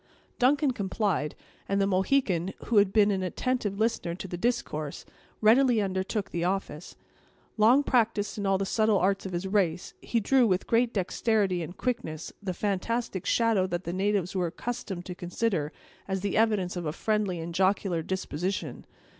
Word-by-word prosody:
Duncan 280 +2 +3
complied; 195 - -1 0.3
and 200 0 +1
the 195 - +3
Mohican, 190 -2 +1
who 230 - +1
had 200 -1 +5
been 210 0 +4
an 190 -1 0
attentive 205 +2 -1
listener 220 -6 0
to 190 - -7
the 175 - -5
discourse, 175 -8 -2 0.4
readily 235 +2 +5
undertook 195 +1 -2
the 170 - -2
office. 180 -3 -3 0.6
Long 235 +6 +5
practised 215 -6 +1
in 200 - -1
all 195 0 +3
the 195 - -1
subtle 215 +1 +2
arts 195 +1 +1
of - - -7
his 175 +1 -3
race, 185 -4 0
he 235 - 0
drew, 250 +3 +3
with 185 -2 +1
great 235 +1 +2
dexterity 195 -1 0
and 170 +3 -7
quickness, 230 -11 -3
the 195 -2 -3
fantastic 205 +1 -2
shadow 225 -5 +2
that 175 0 -3
the 170 - -4
natives 195 -1 0
were 180 -2 +1
accustomed 190 -1 -5
to 180 - -5
consider 175 -3 -2 0.4
as 190 -1 -2
the 200 -1 -2
evidence 210 -5 +2
of 175 -3 -3
a - - 0
friendly 210 -4 -1
and 165 +1 -5
jocular 190 -1 +1
disposition. 185 +1 -3
195 Hz, 170 wpm, -28 LUFS, 180-220 Hz, 0.6 s, had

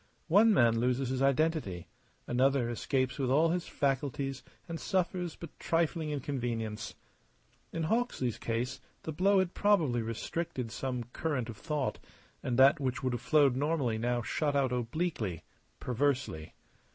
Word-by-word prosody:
One 210 +6 +6
man 115 - +4
loses 125 +2 +1
his 130 0 -1
identity; 140 - +1 0.4
another 125 -1 +2
escapes 130 +2 -1
with 130 -2 0
all 155 +5 +4
his 175 +1 -1
faculties 135 -1 -1 0.3
and 165 -1 -5
suffers 180 -2 -1
but 170 - -11
trifling 165 -1 0
inconvenience. 120 -6 -3 0.8
In 165 - -2
Hawksley's 155 - 0
case 115 +2 -2 0.2
the 160 - -4
blow 195 +6 +3
had 185 -2 +1
probably 165 - +2
restricted 115 +2 -3
some 125 -1 -3
current 140 -7 -2
of 110 - -7
thought, 150 -4 -2 0.4
and 120 -2 -1
that 135 +4 +6
which 130 -2 -2
would 130 -1 0
have 120 - -3
flowed 140 -1 +4
normally 135 -5 0
now 120 +1 0
shot 145 +4 -1
out 135 -3 +2
obliquely, 120 - -2 0.4
perversely. 125 - -1
135 Hz, 140 wpm, -31 LUFS, 120-160 Hz, 0.8 s, One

